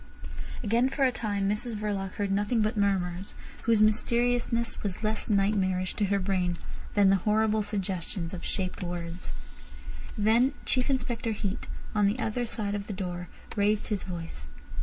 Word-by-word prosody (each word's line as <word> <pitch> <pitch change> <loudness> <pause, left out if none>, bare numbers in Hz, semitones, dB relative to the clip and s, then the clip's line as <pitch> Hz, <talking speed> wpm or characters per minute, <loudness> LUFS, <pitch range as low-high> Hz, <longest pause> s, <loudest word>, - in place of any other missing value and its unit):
Again 235 +4 +3
for 275 - 0
a 255 - +4
time 205 -5 -1
Mrs 215 +3 0
Verloc 200 -3 -2
heard 200 -1 -1
nothing 210 +3 +2
but 215 +3 0
murmurs, 190 -2 0 0.3
whose 225 -2 +5
mysteriousness 235 +1 +2
was 200 +1 -3
less 215 +1 0
nightmarish 195 -3 +2
to 210 - +1
her 200 +1 +2
brain 185 -2 0 0.4
than 200 -2 +6
the 195 - +5
horrible 215 +2 +2
suggestions 190 -3 -2
of 180 - -5
shaped 185 -2 -2
words. 175 0 -4 0.9
Then 230 +6 +4
Chief 255 0 +1
Inspector 240 -3 0
Heat, 205 +2 -3 0.3
on 210 -2 +4
the 205 +4 +1
other 240 0 -1
side 210 -3 -1
of 205 -1 -3
the 210 - -3
door, 180 -2 -4 0.3
raised 210 +1 +2
his 210 -3 0
voice. 165 - -6
205 Hz, 160 wpm, -29 LUFS, 190-220 Hz, 0.9 s, than